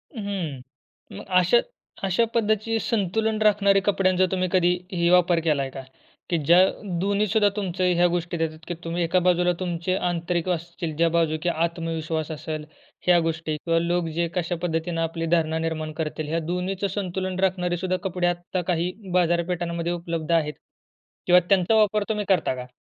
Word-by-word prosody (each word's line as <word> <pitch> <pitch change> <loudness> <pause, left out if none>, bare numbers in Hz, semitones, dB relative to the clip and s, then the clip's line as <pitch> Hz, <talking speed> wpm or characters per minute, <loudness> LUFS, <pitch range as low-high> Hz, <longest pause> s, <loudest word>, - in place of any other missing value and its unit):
हं, 190 - -4 0.6
मग - - -9
अशा 180 +6 +4 0.5
अशा 195 +4 +2
पद्धतीचे 220 0 +1
संतुलन 220 0 0
राखणारे 200 -2 +4
कपड्यांचा 185 -2 +3
तुम्ही 185 -1 0
कधीही 180 -1 +1
वापर 175 -1 +4
केला 150 -4 +2
आहे 135 -1 -4
का? 135 - -7 0.5
की 175 - +1
ज्या 170 +4 +6 0.4
2न्ही 200 +3 +1
सुद्धा 210 0 +3
तुमचं 185 -3 -2
ह्या 175 +1 +4
गोष्टी 175 0 -2
देतात 160 -1 -2
की 175 - -2
तुम्ही 170 +1 -2
एका 170 +2 +2
बाजूला 180 0 +3
तुमचे 180 0 -1
आंतरिक 175 -1 -1
असतील, 170 -2 -3
ज्या 165 +2 +3
बाजू 165 -1 +1
की 175 - +2
आत्मविश्वास 165 -1 -2
असेल 155 0 -5 0.4
ह्या 175 -1 +6
गोष्टी 160 -1 -2
किंवा 165 +2 0
लोक 170 0 0
जे 170 0 +1
कशा 175 0 -1
पद्धतीनं 165 0 -1
आपली 165 0 -2
धारणा 160 -1 0
निर्माण 160 -1 -3
करतील 155 0 -4
ह्या 165 +2 0
2न्हीचं 185 +2 -1
संतुलन 185 -1 -3
राखणारे 180 -2 0
सुद्धा 185 +1 -1
कपडे 180 -1 0
आत्ता 175 +1 -2
काही 175 +1 0 0.2
बाजारपेठांमध्ये 170 -1 0
उपलब्ध 170 -2 -4
आहेत 155 -3 +2 0.7
किंवा 180 0 +7
त्यांचा 195 +2 +3
वापर 215 -1 +3
तुम्ही 210 -1 -1
करता 180 -8 +2
का? 125 0 -7
175 Hz, 165 wpm, -24 LUFS, 165-185 Hz, 0.7 s, किंवा